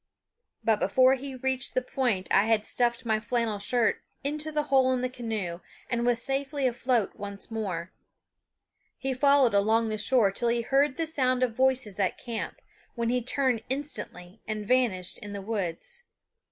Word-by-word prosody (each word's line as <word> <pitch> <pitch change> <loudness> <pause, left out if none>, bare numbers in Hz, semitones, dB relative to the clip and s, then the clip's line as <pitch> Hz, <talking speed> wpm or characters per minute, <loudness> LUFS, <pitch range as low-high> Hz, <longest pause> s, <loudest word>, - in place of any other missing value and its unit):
But 220 -2 +2
before 255 +6 +4
he 270 0 -4
reached 265 +1 -1
the 255 - +3
point 245 -8 -1
I 200 - +5
had 220 -1 +2
stuffed 240 -1 0
my 220 -1 +1
flannel 225 -1 -1
shirt 230 +2 +1 0.2
into 300 +2 -2
the 300 -1 0
hole 265 -3 +3
in 255 - -1
the 255 - -1
canoe 220 -9 -4 0.3
and 235 0 +1
was 240 -1 +3
safely 275 +1 -1
afloat 245 -3 +1
once 200 +2 -4
more. 185 -6 -4 1.0
He 270 0 -2
followed 280 -2 +4
along 220 +3 +3
the 215 0 -2
shore 215 -2 +4
till 235 +4 0
he 235 0 +1
heard 270 +3 +2
the 330 - 0
sound 255 -5 +1
of 235 -3 0
voices 255 -5 +1
at 190 -2 +1
camp, 235 -3 -5 0.3
when 235 -1 -1
he 250 +1 +1
turned 250 -1 +1
instantly 220 -9 -5
and 215 -1 -3
vanished 225 -8 +1
in 205 -1 -7
the 200 - -4
woods. 210 - -3
240 Hz, 170 wpm, -28 LUFS, 215-265 Hz, 1.0 s, I